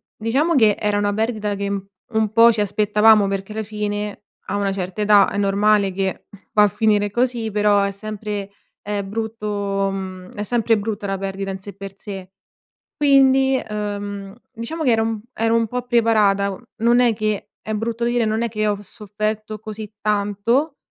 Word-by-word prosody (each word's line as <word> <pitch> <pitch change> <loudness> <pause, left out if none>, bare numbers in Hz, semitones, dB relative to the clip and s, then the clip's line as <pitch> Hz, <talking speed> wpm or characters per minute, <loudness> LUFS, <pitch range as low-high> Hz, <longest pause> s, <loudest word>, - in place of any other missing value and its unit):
diciamo, 270 +10 +1
che 220 -8 +5
era 210 -1 +1
una 205 0 +1
perdita 215 -1 -1
che, 200 0 -3
mhmm, 195 -1 -4 0.3
un 220 -1 +1
po' 230 +1 +7
ci 220 -2 -1
aspettavamo, 210 +1 +4
perché 195 +1 -3
la 220 - -2
fine, 210 -1 -4 0.2
a 195 - -1
una 200 -1 0
certa 190 +1 -4
età 205 -1 +6
è - - -3
normale 200 0 +3
che 190 0 -2 0.3
va 210 - +5
a - - +6
finire 205 0 +1
così, 240 0 0
però, 205 0 +3
è 200 - +1
sempre, 205 0 -5 0.3
uhm, 200 -1 -3
brutto 205 -2 -2
mhmm, 185 -1 -7
è 205 - -3
sempre 230 0 +1
brutta 205 0 -3
la 195 0 -1
perdita 195 0 -4
in 190 - -6
sé 200 +1 -9
per 195 0 -9
sé. 195 -2 -8 0.7
Quindi, 270 -2 +4
uhm, 205 -1 -4 0.2
diciamo, 255 +7 -5
che 255 - +3
ero 225 -1 +3
un 225 -1 -2
ero 225 +1 +1
un 230 -1 +2
po' 250 +3 -3
preparata, 215 -5 +3
mhmm, 195 - -9
non 235 +2 +3
è 245 -2 +4
che 215 -1 -2
è 220 - -4
brutto 230 +2 -2
dire, 240 -1 +1
non 220 +1 0
è 235 - 0
che 215 -1 -1
ho 205 - +1
v - - -11
sofferto 215 +1 -4
così 215 -1 -8
tanto, 210 +8 0
210 Hz, 185 wpm, -21 LUFS, 200-225 Hz, 0.7 s, po